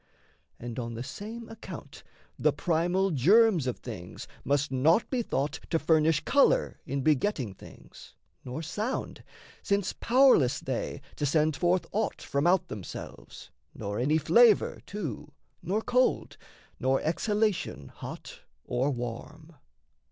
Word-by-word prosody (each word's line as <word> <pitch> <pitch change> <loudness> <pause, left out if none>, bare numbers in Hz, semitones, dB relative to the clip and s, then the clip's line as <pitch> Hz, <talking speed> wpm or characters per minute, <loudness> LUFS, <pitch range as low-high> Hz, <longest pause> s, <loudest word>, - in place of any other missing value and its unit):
And 120 +1 -6
on 115 -1 -4
the 115 - -5
same 225 - -8
account 225 - -10 0.4
The - - +3
primal 175 +3 +1
germs 180 - +4
of 125 - -2
things 95 -7 -8 0.2
must 140 +1 0
not 150 - +3
be 255 -2 +1
thought 150 - -2
To 165 - +2
furnish 160 -2 +3
colour 390 - +3
in 140 0 -2
begetting 145 - +1
things, - - -15 0.3
Nor 130 +6 -5
sound, 210 - -4 0.4
since 200 -1 0
pow'rless 230 - +4
they 130 +2 -4 0.2
to 145 - -1
send 155 +1 +2
forth 175 +2 +1
aught 215 +1 -1
From 140 +4 -1
out 185 0 +3
themselves, 100 -4 -9 0.2
nor 100 +2 -4
any 145 +6 +2
flavour, 205 +9 +4
too, 150 - -6 0.3
Nor 195 +6 -1
cold, 250 +1 +1 0.4
nor 130 +1 +2
exhalation 200 - -1
hot - - -9 0.3
or 125 +3 0
warm. 140 +6 -6
155 Hz, 130 wpm, -28 LUFS, 130-205 Hz, 0.4 s, germs